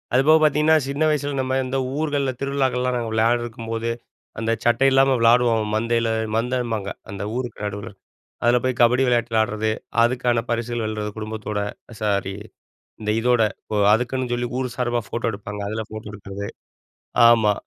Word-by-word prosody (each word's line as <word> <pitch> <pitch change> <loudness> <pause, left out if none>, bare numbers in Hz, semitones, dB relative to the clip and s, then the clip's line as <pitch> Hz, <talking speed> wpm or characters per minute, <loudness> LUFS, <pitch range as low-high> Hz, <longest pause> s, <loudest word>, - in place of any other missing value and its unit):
அதுபோக, 150 +5 +6
பார்த்தீங்கன்னா 150 +1 +4
சின்ன 140 +3 0
வயசில 145 -2 -1
நம்ம 130 0 -2
இந்த 130 +1 -2 0.2
ஊர்கள்ல, 145 -3 0
திருவிழாக்கள்லாம் 130 -2 0
நாங்க 115 -2 -3
விளையாடருக்கும்போது, 115 0 0 0.5
அந்த 115 0 0
சட்டை 120 +3 +4
இல்லாம 135 0 +4
விளாடுவோம் 115 -2 +3
மந்தையில. 115 +1 +1 0.3
மந்தைபாங்க. 115 -4 -1 0.2
அந்த 100 0 -5
ஊருக்கு 120 -4 -4
நடுவுல. 105 +2 -5 0.5
அதில 120 +1 +4
போய், 130 -1 0
கபடி 120 +2 +5
விளையாட்டு 120 -1 +1
விளையாடுறது. 110 0 +1 0.3
அதுக்கான 120 0 +1
பரிசுகள் 120 0 -2
வெல்றது, 110 -1 -3
குடும்பத்தோட. 110 -1 -4 0.4
சாரி, 100 -2 0 0.7
இந்த 105 0 0
இதோட. 120 0 +3 0.2
இப்போ, 105 - -4 0.2
அதுக்குன்னு 125 +2 -1
சொல்லி, 120 0 -1
ஊர் 125 -2 -3
சார்பா 120 -1 0
ஃபோட்டோ 115 +2 -2
எடுப்பாங்க. 105 0 -7
அதில 110 +1 -3
ஃபோட்டோ 110 -1 -8
எடுக்கிறது. 100 0 -7 0.8
ஆமா, 110 -3 +4
120 Hz, 145 wpm, -22 LUFS, 110-125 Hz, 0.8 s, அதுபோக